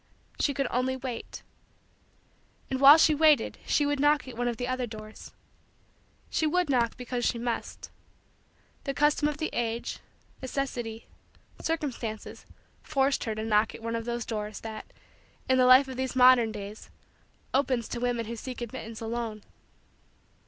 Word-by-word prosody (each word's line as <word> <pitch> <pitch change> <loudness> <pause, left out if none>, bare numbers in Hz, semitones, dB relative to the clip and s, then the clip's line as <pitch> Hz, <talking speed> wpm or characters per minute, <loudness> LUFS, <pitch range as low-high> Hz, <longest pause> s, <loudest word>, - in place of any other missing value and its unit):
She 280 - +1
could 275 - 0
only 255 +2 0
wait. 255 -3 -6 1.3
And 265 0 -1
while 280 +3 +10
she 315 - +5
waited 305 0 +3
she 290 - +2
would 290 -1 0
knock 290 0 +3
at 255 - -8
one 245 +1 -1
of 240 -2 -2
the 245 - -3
other 255 -1 -2
doors. 215 0 -10 1.0
She 315 - +1
would 355 -1 +1
knock 235 -3 +1
because 245 -1 -4
she 235 - +1
must. 235 0 -4 0.9
The 275 -1 -2
custom 295 0 +3
of 300 -1 -3
the 315 - -3
age, 235 0 -2 0.4
necessity, 245 -4 -4 0.6
circumstances, 255 -9 -4 0.3
forced 275 -2 0
her 220 -2 -2
to 215 +1 -4
knock 215 0 +2
at - - -12
one 230 0 -2
of 230 -1 -3
those 240 -1 -3
doors 210 -2 -4
that, 220 -1 -8 0.6
in 260 0 +3
the 250 - +5
life 260 +2 +7
of 260 -1 -7
these 260 0 -2
modern 250 -3 +6
days, 210 0 -8 0.6
opens 255 -3 +1
to 240 - -4
women 240 -1 -1
who 230 +2 -5
seek 250 +2 -7
admittance 230 -2 -7
alone. 225 -2 -4
245 Hz, 160 wpm, -28 LUFS, 230-275 Hz, 1.3 s, while